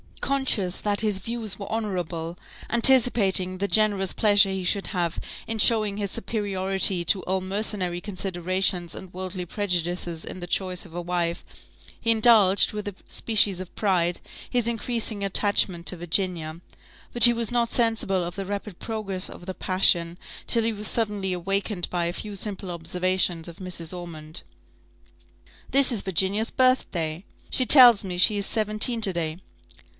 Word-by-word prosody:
Conscious 250 -10 -1
that 205 -1 -1
his 210 -3 0
views 220 -1 -1
were 200 - -7
honourable, 180 -6 -4 0.3
anticipating 225 -7 +4
the 200 +2 -2
generous 205 -3 +2
pleasure 205 -2 +4
he 190 -1 -3
should 195 +2 -2
have 175 -4 -2 0.3
in 225 -1 -4
showing 215 -2 +3
his 200 -1 -3
superiority 195 -4 +1
to 190 +2 +1
all 190 +1 -2
mercenary 190 -2 -3
considerations 185 -2 -2
and 185 -1 -11
worldly 185 0 -6
prejudices, 175 -3 -2
in - - -8
the 175 - -7
choice 185 0 -2
of 165 - -14
a 175 - -3
wife, 170 -1 -2 0.6
he 230 - +1
indulged, 215 -4 +4
with 210 -1 -6
a 205 - -6
species 205 -4 +1
of 185 -1 -9
pride, 175 -4 0 0.3
his 245 -2 0
increasing 230 -2 -2
attachment 195 -3 +1
to 180 - -1
Virginia; 170 -2 -1 0.5
but 240 - +8
he 240 - +8
was 230 -1 -2
not 240 -1 0
sensible 225 -6 0
of 170 0 -6
the 195 0 -5
rapid 200 -1 -6
progress 205 -5 -5
of 175 - -12
the 190 - -5
passion, 175 -2 +1 0.3
till 230 -1 +4
he 225 0 0
was 210 0 -6
suddenly 210 -4 -2
awakened 195 +1 -2
by 175 -1 -1
a 170 - -3
few 210 +2 -7
simple 195 -2 -4
observations 175 0 -1
of 170 - -13
Mrs. 180 -3 -5
Ormond. 160 -3 -5 1.3
"This 275 -1 +4
is 225 -5 -2
Virginia's 195 +4 0
birthday 180 -10 0 0.3
she 255 - +1
tells 245 -6 +8
me 180 -2 -5
she 205 +4 +4
is 200 - -2
seventeen 215 +2 0
to 195 -4 +3
day." 160 -2 -3
195 Hz, 160 wpm, -24 LUFS, 180-215 Hz, 1.3 s, but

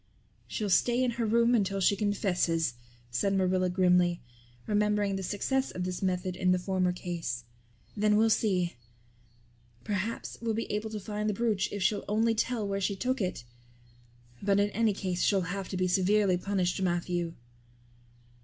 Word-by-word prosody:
"She'll 210 -3 -3
stay 240 +6 +3
in 250 - +1
her 235 -1 -2
room 235 +2 +3
until 195 -4 +1
she 195 +2 +3
confesses," 180 - 0 0.4
said 195 +12 +1
Marilla 185 -1 +2
grimly, 180 -1 +3 0.5
remembering 210 -1 +1
the 195 - -3
success 260 +8 -1
of 180 - -4
this 180 0 -3
method 185 -1 -1
in 185 0 0
the 180 - +3
former 185 0 0
case. 170 -9 -4 0.5
"Then 210 0 +3
we'll 220 +1 +4
see. 185 - +1 1.1
Perhaps 205 +2 -3
we'll 225 -2 -1
be 230 - -2
able 210 +1 -2
to 215 -1 -5
find 210 +1 -3
the 210 - -1
brooch 215 -3 0
if 200 -2 -3
she'll 200 +2 +1
only 225 +2 +2
tell 225 -1 -1
where 195 0 -2
she 200 +1 0
took 255 +5 -1
it; 180 -9 -2 1.0
but 200 0 +2
in 205 0 +2
any 225 0 +2
case 185 -3 -2
she'll 195 -2 +3
have 190 +2 -4
to 185 - -3
be 185 0 +1
severely 190 +1 +3
punished, 185 0 -1
Matthew." 175 -1 -1
195 Hz, 165 wpm, -29 LUFS, 180-215 Hz, 1.1 s, we'll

